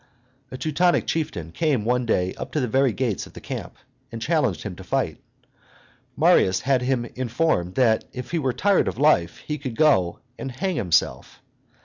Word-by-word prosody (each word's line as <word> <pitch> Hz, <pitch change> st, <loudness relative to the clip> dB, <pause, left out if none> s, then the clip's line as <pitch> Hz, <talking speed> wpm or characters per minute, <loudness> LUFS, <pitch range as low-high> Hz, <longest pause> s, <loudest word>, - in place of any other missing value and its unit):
A 130 Hz, -, -7 dB
Teutonic 170 Hz, +5 st, +2 dB
chieftain 90 Hz, -, -3 dB
came 140 Hz, -, 0 dB
one 125 Hz, 0 st, +1 dB
day 90 Hz, -4 st, +1 dB
up -, -, -7 dB
to 155 Hz, -, +1 dB
the 125 Hz, -, 0 dB
very 130 Hz, +2 st, +2 dB
gates 115 Hz, -3 st, -2 dB
of -, -, -17 dB
the -, -, -9 dB
camp, -, -, -6 dB, 0.4 s
and 115 Hz, -, -6 dB
challenged 130 Hz, -, 0 dB
him 100 Hz, -4 st, -5 dB
to 95 Hz, -, -9 dB
fight. -, -, -1 dB, 1.0 s
Marius 95 Hz, 0 st, +4 dB
had 130 Hz, -1 st, +2 dB
him 125 Hz, -1 st, 0 dB
informed 120 Hz, -, 0 dB
that 115 Hz, -4 st, +3 dB
if 125 Hz, -1 st, -7 dB
he 170 Hz, -, 0 dB
were 135 Hz, -4 st, 0 dB
tired 195 Hz, -, +2 dB
of -, -, -3 dB
life 125 Hz, -, +2 dB
he 150 Hz, -1 st, -3 dB
could 130 Hz, -5 st, -5 dB
go 125 Hz, -, +3 dB, 0.2 s
and 135 Hz, -, -5 dB
hang 185 Hz, +7 st, -2 dB
himself. 85 Hz, -, 0 dB
125 Hz, 180 wpm, -24 LUFS, 105-150 Hz, 1.0 s, Marius